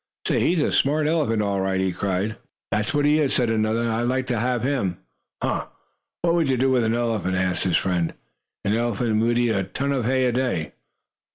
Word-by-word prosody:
"Say, -, -, +2 dB
he's 175 Hz, 0 st, +2 dB
a -, -, +1 dB
smart 150 Hz, +2 st, +2 dB
elephant 150 Hz, -9 st, +1 dB
all 100 Hz, -1 st, 0 dB
right!" 95 Hz, 0 st, 0 dB
he 95 Hz, 0 st, +1 dB
cried. 95 Hz, +4 st, -2 dB, 0.4 s
"That's 105 Hz, 0 st, 0 dB
what 145 Hz, 0 st, +1 dB
he 150 Hz, +1 st, +4 dB
is!" 145 Hz, -3 st, +1 dB
said 120 Hz, -3 st, +2 dB
another. 110 Hz, +1 st, +1 dB
"I'd 115 Hz, +1 st, 0 dB
like 130 Hz, +1 st, 0 dB
to 115 Hz, -, 0 dB
have 120 Hz, 0 st, 0 dB
him!" 125 Hz, -10 st, 0 dB, 0.5 s
"Huh! -, -, -1 dB, 0.6 s
What 170 Hz, -1 st, +3 dB
would 165 Hz, -5 st, +2 dB
you 130 Hz, -, +2 dB
do 130 Hz, +2 st, +2 dB
with 125 Hz, -2 st, +3 dB
an 110 Hz, +1 st, +1 dB
elephant?" 115 Hz, -6 st, -1 dB
asked 95 Hz, 0 st, 0 dB
his 90 Hz, -3 st, +3 dB
friend. 90 Hz, -3 st, 0 dB, 0.5 s
"An 100 Hz, -, +2 dB
elephant 115 Hz, -1 st, 0 dB
would 120 Hz, +1 st, +2 dB
eat 120 Hz, -1 st, +2 dB
a 95 Hz, -2 st, 0 dB
ton 135 Hz, +10 st, -3 dB
of 130 Hz, -5 st, 0 dB
hay 130 Hz, +1 st, +2 dB
a 125 Hz, -, +2 dB
day." 120 Hz, -11 st, -1 dB
115 Hz, 215 wpm, -23 LUFS, 100-130 Hz, 0.6 s, he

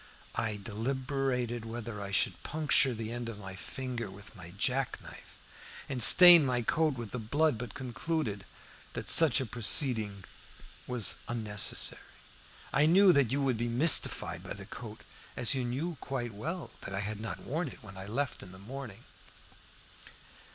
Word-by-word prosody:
I 110 Hz, -2 st, -2 dB
deliberated 125 Hz, +2 st, -3 dB
whether 115 Hz, -2 st, -7 dB
I 100 Hz, -, -6 dB
should 100 Hz, -, 0 dB
puncture 145 Hz, -4 st, +2 dB
the 110 Hz, 0 st, -5 dB
end 120 Hz, -1 st, -5 dB
of 110 Hz, -, -8 dB
my 95 Hz, -2 st, -9 dB
finger 120 Hz, +1 st, -6 dB
with 100 Hz, +3 st, -13 dB
my 90 Hz, -4 st, -11 dB
jack 130 Hz, +3 st, -1 dB
knife -, -, -13 dB, 0.5 s
and 130 Hz, -3 st, -3 dB
stain 175 Hz, +4 st, +10 dB
my 125 Hz, -3 st, 0 dB
coat 155 Hz, +4 st, +1 dB
with 115 Hz, -4 st, -7 dB
the 125 Hz, -, -4 dB
blood, 145 Hz, +3 st, 0 dB
but 120 Hz, -5 st, -7 dB
concluded 125 Hz, -4 st, -3 dB, 0.5 s
that -, -, -5 dB
such 160 Hz, -7 st, +6 dB
a 130 Hz, -, -2 dB
proceeding 110 Hz, -3 st, +2 dB, 0.6 s
was 125 Hz, -5 st, 0 dB
unnecessary. 110 Hz, -3 st, -2 dB, 0.7 s
I 145 Hz, +3 st, +4 dB
knew 185 Hz, +2 st, +6 dB
that 140 Hz, -6 st, +2 dB
you 140 Hz, +1 st, 0 dB
would 130 Hz, -4 st, 0 dB
be 120 Hz, +1 st, -2 dB
mystified 135 Hz, +7 st, +3 dB
by -, -, -7 dB
the -, -, -9 dB
coat -, -, -10 dB, 0.4 s
as 120 Hz, -, +2 dB
you 130 Hz, -2 st, -1 dB
knew 140 Hz, +7 st, -4 dB
quite 120 Hz, -4 st, -4 dB
well 160 Hz, -, -6 dB
that 95 Hz, -, -6 dB
I 100 Hz, -, -2 dB
had 105 Hz, +1 st, -5 dB
not 110 Hz, -, -6 dB
worn 160 Hz, +5 st, -3 dB
it 125 Hz, -, -11 dB
when 95 Hz, -3 st, -11 dB
I 95 Hz, +1 st, -8 dB
left 135 Hz, +5 st, -3 dB
home -, -, -10 dB
in 90 Hz, -, -14 dB
the -, -, -12 dB
morning. 115 Hz, +1 st, -9 dB
120 Hz, 170 wpm, -30 LUFS, 110-140 Hz, 0.7 s, stain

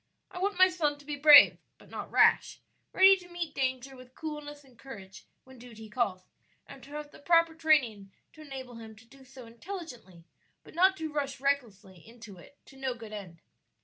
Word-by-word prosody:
I 360 Hz, -, -8 dB
want 395 Hz, 0 st, -2 dB
my 370 Hz, 0 st, +7 dB
son 315 Hz, -6 st, -2 dB
to 290 Hz, -, -18 dB
be 295 Hz, 0 st, -5 dB
brave, 290 Hz, 0 st, +7 dB, 0.2 s
but -, -, -20 dB
not -, -, -7 dB
rash; -, -, +3 dB, 0.3 s
ready 385 Hz, +1 st, +6 dB
to 355 Hz, -1 st, -15 dB
meet 345 Hz, -3 st, -6 dB
danger 260 Hz, -1 st, -3 dB
with 255 Hz, 0 st, -16 dB
coolness 295 Hz, -2 st, -8 dB
and 260 Hz, -3 st, -22 dB
courage 200 Hz, -7 st, -13 dB, 0.2 s
when 260 Hz, -1 st, -17 dB
duty 225 Hz, -3 st, -13 dB
calls, 200 Hz, -6 st, -2 dB, 0.4 s
and 275 Hz, -1 st, -14 dB
to 275 Hz, -, -15 dB
have 300 Hz, 0 st, -7 dB
the -, -, -16 dB
proper 335 Hz, +1 st, +2 dB
training 265 Hz, -12 st, 0 dB, 0.2 s
to 310 Hz, -, -15 dB
enable 260 Hz, -5 st, -9 dB
him 220 Hz, -1 st, -12 dB
to 220 Hz, +2 st, -19 dB
do 270 Hz, +3 st, -19 dB
so 260 Hz, -1 st, -14 dB
intelligently, 235 Hz, -, -10 dB, 0.4 s
but -, -, -16 dB
not 375 Hz, +3 st, +3 dB
to 315 Hz, -1 st, -6 dB
rush 275 Hz, -3 st, -3 dB
recklessly 225 Hz, -9 st, -3 dB
into 220 Hz, 0 st, -14 dB
it 280 Hz, -, -18 dB
to 270 Hz, -, -17 dB
no 265 Hz, -2 st, -3 dB
good 225 Hz, -2 st, -11 dB
end." 180 Hz, -5 st, -10 dB
270 Hz, 195 wpm, -29 LUFS, 230-310 Hz, 0.4 s, my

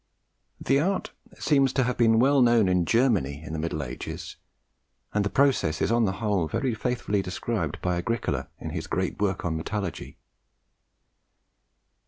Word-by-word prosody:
The 135 Hz, -, +2 dB
art 190 Hz, +5 st, -1 dB, 0.3 s
seems 135 Hz, -3 st, +3 dB
to 130 Hz, -, +2 dB
have 125 Hz, 0 st, -1 dB
been 115 Hz, -2 st, +4 dB
well 135 Hz, +3 st, +4 dB
known 120 Hz, -4 st, +5 dB
in 90 Hz, -2 st, +2 dB
Germany 100 Hz, -, +1 dB
in 80 Hz, -, -7 dB
the 80 Hz, -, -3 dB
Middle 75 Hz, -2 st, -2 dB
Ages, -, -, -7 dB, 0.8 s
and 105 Hz, -, +2 dB
the 100 Hz, -, 0 dB
process 130 Hz, -, +2 dB
is -, -, +1 dB
on 115 Hz, -1 st, +3 dB
the 95 Hz, -, 0 dB
whole 100 Hz, -4 st, 0 dB
very 125 Hz, -, -1 dB
faithfully 110 Hz, -3 st, -1 dB
described 95 Hz, +4 st, -3 dB
by 90 Hz, -1 st, 0 dB
Agricola 115 Hz, +7 st, -2 dB
in -, -, -6 dB
his -, -, -4 dB
great -, -, -2 dB
work 95 Hz, -3 st, 0 dB
on 80 Hz, -2 st, -1 dB
Metallurgy. 95 Hz, +2 st, -4 dB
105 Hz, 160 wpm, -26 LUFS, 90-125 Hz, 0.8 s, known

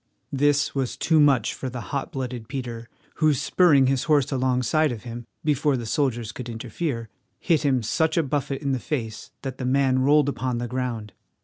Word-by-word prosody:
This 145 Hz, +1 st, +2 dB
was 135 Hz, -3 st, -2 dB
too 160 Hz, -1 st, +3 dB
much 140 Hz, -6 st, +4 dB
for 130 Hz, -, -5 dB
the 125 Hz, 0 st, -6 dB
hot 140 Hz, -1 st, -2 dB
blooded 125 Hz, -4 st, -5 dB
Peter, 120 Hz, -4 st, -6 dB, 0.3 s
who, 155 Hz, -2 st, +3 dB
spurring 145 Hz, 0 st, +4 dB
his 130 Hz, 0 st, +1 dB
horse 150 Hz, -4 st, +3 dB
alongside 130 Hz, +3 st, +1 dB
of 115 Hz, -3 st, -6 dB
him, 120 Hz, -1 st, -7 dB, 0.2 s
before 150 Hz, -2 st, +2 dB
the 120 Hz, -, -5 dB
soldiers 120 Hz, -2 st, -1 dB
could 120 Hz, +2 st, -7 dB
interfere, 115 Hz, +2 st, -4 dB, 0.3 s
hit 165 Hz, -4 st, +2 dB
him 130 Hz, -4 st, +1 dB
such 160 Hz, +8 st, +1 dB
a 165 Hz, -, +4 dB
buffet 140 Hz, 0 st, -2 dB
in 140 Hz, -, 0 dB
the 130 Hz, -, 0 dB
face 115 Hz, -7 st, -4 dB
that 130 Hz, -2 st, -5 dB
the -, -, -3 dB
man 130 Hz, 0 st, +2 dB
rolled 145 Hz, +2 st, +4 dB
upon 130 Hz, -3 st, -1 dB
the 120 Hz, 0 st, -3 dB
ground. 120 Hz, -4 st, -3 dB
130 Hz, 190 wpm, -24 LUFS, 120-145 Hz, 0.3 s, much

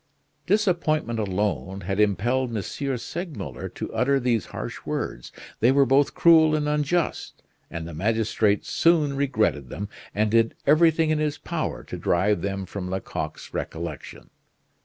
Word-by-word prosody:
Disappointment 170 Hz, -, +1 dB
alone 100 Hz, -1 st, -2 dB
had 95 Hz, +2 st, -3 dB
impelled 120 Hz, +6 st, +2 dB
M. 100 Hz, -, -2 dB, 0.3 s
Segmuller 170 Hz, +5 st, -6 dB
to -, -, -7 dB
utter 135 Hz, +2 st, +2 dB
these 120 Hz, -3 st, 0 dB
harsh -, -, -6 dB
words; -, -, -4 dB, 0.3 s
they 120 Hz, +3 st, +5 dB
were 140 Hz, 0 st, +5 dB
both 135 Hz, +2 st, +3 dB
cruel 160 Hz, -2 st, +6 dB
and 150 Hz, -1 st, 0 dB
unjust, 150 Hz, +3 st, -1 dB, 0.3 s
and 85 Hz, -1 st, -6 dB
the 85 Hz, -, -8 dB
magistrate 105 Hz, +2 st, +1 dB
soon 155 Hz, -4 st, +2 dB
regretted 110 Hz, -, 0 dB
them, 100 Hz, +1 st, -5 dB, 0.3 s
and 105 Hz, 0 st, +1 dB
did 115 Hz, 0 st, +3 dB
everything 160 Hz, +1 st, +4 dB
in 155 Hz, -, +1 dB
his 150 Hz, -1 st, -1 dB
power -, -, -4 dB
to -, -, -7 dB
drive 95 Hz, +2 st, +1 dB
them 95 Hz, 0 st, -3 dB
from 95 Hz, 0 st, -6 dB
Lecoq's 80 Hz, -4 st, -5 dB
recollection. -, -, -6 dB
120 Hz, 140 wpm, -25 LUFS, 100-150 Hz, 0.3 s, cruel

